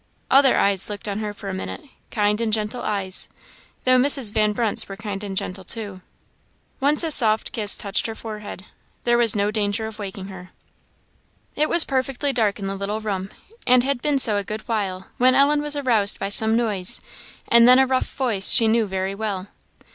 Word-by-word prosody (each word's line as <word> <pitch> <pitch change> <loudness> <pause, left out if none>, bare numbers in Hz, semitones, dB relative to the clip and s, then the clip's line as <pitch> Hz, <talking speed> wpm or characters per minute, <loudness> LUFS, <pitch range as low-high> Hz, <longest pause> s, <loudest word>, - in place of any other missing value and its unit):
Other 270 -1 +5
eyes 200 -1 +4
looked 205 0 -7
on 200 0 -3
her 210 -1 -4
for 200 -1 -11
a 195 - -4
minute 190 - -6 0.3
kind 210 0 0
and 225 -1 -1
gentle 215 +3 -2
eyes; 195 -3 -1 0.5
though 255 0 +4
Mrs. 265 -4 +2
Van 215 0 +1
Brunt's 215 -1 -1
were 195 - -7
kind 205 -2 -6
and 195 -2 -6
gentle 190 +1 -4
too; 200 -2 -6 0.8
once 290 +4 +2
a 325 - -1
soft 220 -6 +3
kiss 210 -2 +1
touched 200 +2 -1
her 225 - -6
forehead 210 -4 -9 0.4
there 240 0 +2
was 230 -3 +3
no 205 0 0
danger 210 0 -2
of 220 0 -8
waking 195 -1 -7
her. 185 -1 -11 1.1
It 305 +1 +1
was 340 -1 +6
perfectly 270 +1 -2
dark 220 -5 0
in 200 - -7
the 195 - -3
little 200 +2 -4
bedroom, 195 -3 -4 0.4
and 250 0 +5
had 270 -2 -1
been 295 -2 0
so 220 -6 +3
a 200 - -2
good 215 +2 -6
while, 195 -4 -3
when 255 +1 +4
Ellen 290 +2 +3
was 295 0 -2
aroused 235 -8 +2
by 195 - -4
some 220 +2 +3
noise, 215 -2 -1 0.5
and 235 0 +6
then 250 +1 +7
a 265 - +4
rough 260 0 -2
voice 225 -7 +3
she 225 - +5
knew 225 -1 +1
very 190 0 -3
well. 200 -2 -5
215 Hz, 200 wpm, -21 LUFS, 200-245 Hz, 1.1 s, then